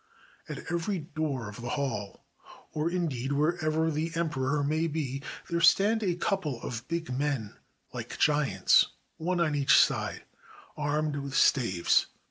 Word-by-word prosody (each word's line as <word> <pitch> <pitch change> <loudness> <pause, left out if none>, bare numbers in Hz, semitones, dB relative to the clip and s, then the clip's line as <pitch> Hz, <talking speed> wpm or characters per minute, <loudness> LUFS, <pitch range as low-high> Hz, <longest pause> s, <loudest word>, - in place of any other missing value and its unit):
At - - -6
every 175 +3 -1
door 150 -6 -3
of 105 +3 -9
the 120 - -5
hall, 105 -8 -4 0.5
or, 155 +2 0
indeed, 145 -7 -2
wherever 155 +1 +1
the 160 +2 -2
emperor 145 -3 0
may 155 +3 +1
be, 140 -4 -3 0.3
there 170 -1 -1
stand 210 +5 +5
a 185 -5 0
couple 175 - -1
of 120 0 -5
big 170 -3 -3
men 135 -6 -2 0.4
like - - -6
giants, 145 -11 +4 0.3
one 175 +2 -1
on 160 -3 +2
each 140 -2 +5
side, - - +2 0.5
armed 150 0 -1
with 140 0 -5
staves. 95 -14 +3
150 Hz, 140 wpm, -29 LUFS, 135-165 Hz, 0.5 s, stand